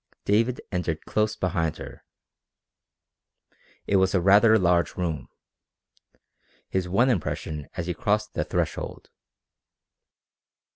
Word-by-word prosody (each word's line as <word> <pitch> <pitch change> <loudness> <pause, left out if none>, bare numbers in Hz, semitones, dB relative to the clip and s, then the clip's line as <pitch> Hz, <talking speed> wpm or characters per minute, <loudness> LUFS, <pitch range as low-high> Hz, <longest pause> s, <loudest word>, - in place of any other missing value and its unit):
David 115 +5 +1
entered 85 -4 -2
close 110 0 0
behind 85 -3 -1
her. - - -10 1.8
It 100 - +2
was 95 +1 +2
a - - +4
rather 105 +5 +6
large 90 -3 +2
room 80 -7 -3 1.4
his 95 -1 -2
one 120 +8 +3
impression 80 -6 -3
as 85 - -2
he 90 - -2
crossed 105 +4 -1
the - - -1
threshold. - - -4
95 Hz, 105 wpm, -25 LUFS, 85-105 Hz, 1.8 s, rather